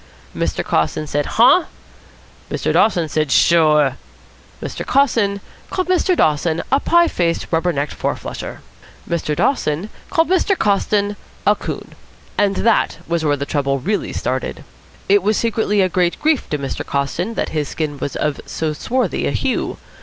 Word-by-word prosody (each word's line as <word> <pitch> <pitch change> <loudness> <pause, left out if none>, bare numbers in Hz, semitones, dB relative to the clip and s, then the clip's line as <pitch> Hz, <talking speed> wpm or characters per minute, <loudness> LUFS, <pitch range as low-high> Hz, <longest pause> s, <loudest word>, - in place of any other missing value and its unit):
Mr. - - -1
Coston 80 - 0
said: 145 -1 -1
"Huh?" 260 +10 +6 0.8
Mr. - - -1
Dawson 175 -7 +3
said: 155 -2 -1
"Sure." 150 -5 +4 0.6
Mr. - - -5
Coston 225 -8 +2 0.3
called 370 -1 -2
Mr. 365 0 +2
Dawson 155 +2 +1
a 270 - +4
pie 340 +3 +4
faced 170 - 0
rubber 170 +2 +2
necked 145 -1 -2
four - - -2
flusher. - - -7 0.5
Mr. 160 -3 -1
Dawson 180 - 0 0.2
called 330 -2 +2
Mr. 375 +1 +2
Coston 205 0 +1 0.3
a 210 - +5
coon. - - -6 0.4
And 200 -1 +2
that 230 -2 +2
was 170 -1 -1
where 145 -2 +2
the 140 - -3
trouble 140 -2 0
really 200 +10 -2
started. 130 0 -3 0.4
It 200 +1 +5
was 210 +3 +1
secretly 220 -3 +1
a 185 - +4
great 180 -1 0
grief 310 -3 +1
to 150 - -1
Mr. 140 -1 -4
Coston 165 +10 -2
that - - -1
his 150 -2 -2
skin 150 -3 -3
was 140 - -4
of 150 -1 -1
so 155 -1 -2
swarthy 250 - -1
a - - 0
hue. - - -1
175 Hz, 160 wpm, -19 LUFS, 150-225 Hz, 0.8 s, Huh